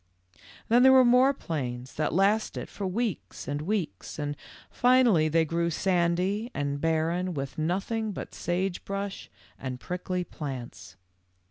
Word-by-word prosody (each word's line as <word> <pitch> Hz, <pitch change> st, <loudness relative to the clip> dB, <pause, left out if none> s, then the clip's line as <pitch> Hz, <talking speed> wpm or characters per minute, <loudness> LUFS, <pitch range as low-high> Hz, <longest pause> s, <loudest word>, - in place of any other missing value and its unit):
"Then 240 Hz, +2 st, +5 dB
there 265 Hz, +1 st, +8 dB
were 260 Hz, -1 st, +7 dB
more 250 Hz, +3 st, +6 dB
plains 130 Hz, -, -4 dB
that 155 Hz, 0 st, -1 dB
lasted 200 Hz, +5 st, +1 dB
for 200 Hz, -, -4 dB
weeks 220 Hz, +1 st, -3 dB
and 145 Hz, +1 st, -2 dB
weeks, 170 Hz, -, -3 dB
and 145 Hz, -1 st, -3 dB, 0.4 s
finally 245 Hz, -11 st, +4 dB
they 165 Hz, +1 st, +3 dB
grew 170 Hz, +2 st, 0 dB
sandy 180 Hz, +5 st, +1 dB
and 140 Hz, 0 st, -2 dB
barren 165 Hz, +3 st, 0 dB
with 135 Hz, +1 st, -4 dB
nothing 200 Hz, +7 st, -1 dB
but -, -, -7 dB
sage 180 Hz, +1 st, -2 dB
brush 195 Hz, 0 st, -5 dB, 0.3 s
and 130 Hz, -2 st, -5 dB
prickly 180 Hz, +2 st, -3 dB
plants. 125 Hz, -, -7 dB
175 Hz, 135 wpm, -28 LUFS, 150-205 Hz, 0.4 s, there